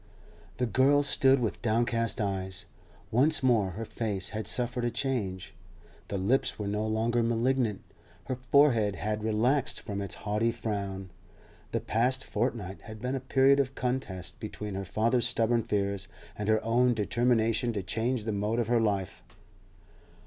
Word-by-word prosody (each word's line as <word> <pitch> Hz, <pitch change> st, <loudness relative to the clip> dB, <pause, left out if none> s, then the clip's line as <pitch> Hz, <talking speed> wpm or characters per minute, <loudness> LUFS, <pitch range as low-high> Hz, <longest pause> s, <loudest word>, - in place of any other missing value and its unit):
The 125 Hz, -, +1 dB
girl 135 Hz, +6 st, +3 dB
stood 135 Hz, -1 st, +4 dB
with 115 Hz, -3 st, -2 dB
downcast 115 Hz, 0 st, +1 dB
eyes. 95 Hz, -3 st, -3 dB, 0.5 s
Once 140 Hz, +6 st, +3 dB
more 115 Hz, -7 st, +3 dB
her 115 Hz, +4 st, -5 dB
face 105 Hz, -5 st, -3 dB
had 110 Hz, 0 st, -4 dB
suffered 125 Hz, 0 st, +2 dB
a 120 Hz, -, +1 dB
change; 110 Hz, -7 st, -2 dB, 0.5 s
the 100 Hz, -, -3 dB
lips 110 Hz, +9 st, +1 dB
were 105 Hz, -, -4 dB
no 105 Hz, +2 st, -1 dB
longer 115 Hz, +2 st, +1 dB
malignant, 115 Hz, -1 st, 0 dB, 0.4 s
her 130 Hz, -, -3 dB, 0.2 s
forehead 120 Hz, -8 st, +4 dB
had 105 Hz, +4 st, -3 dB
relaxed 115 Hz, +6 st, +1 dB
from 100 Hz, -2 st, -5 dB
its 100 Hz, -, -2 dB
haughty 110 Hz, +2 st, 0 dB
frown. 100 Hz, -5 st, -4 dB, 0.6 s
The -, -, -1 dB
past 125 Hz, +4 st, +1 dB
fortnight 105 Hz, -4 st, -3 dB
had 110 Hz, 0 st, -10 dB
been 125 Hz, +4 st, -3 dB
a 135 Hz, -, -1 dB
period 135 Hz, +2 st, +3 dB
of 135 Hz, -1 st, 0 dB
contest 125 Hz, -8 st, -3 dB
between 105 Hz, -1 st, -6 dB
her 95 Hz, 0 st, -4 dB
father's 115 Hz, +6 st, +1 dB
stubborn 120 Hz, -1 st, +1 dB
fears 100 Hz, -3 st, -2 dB, 0.3 s
and 105 Hz, 0 st, -3 dB
her 110 Hz, 0 st, +2 dB
own 120 Hz, +2 st, +3 dB
determination 115 Hz, +1 st, +1 dB
to 100 Hz, -3 st, -3 dB
change 115 Hz, +4 st, -1 dB
the 110 Hz, -, -1 dB
mode 105 Hz, +2 st, -1 dB
of 120 Hz, -2 st, -1 dB
her 120 Hz, -1 st, +3 dB
life. 100 Hz, -4 st, -1 dB
115 Hz, 155 wpm, -29 LUFS, 105-125 Hz, 0.6 s, stood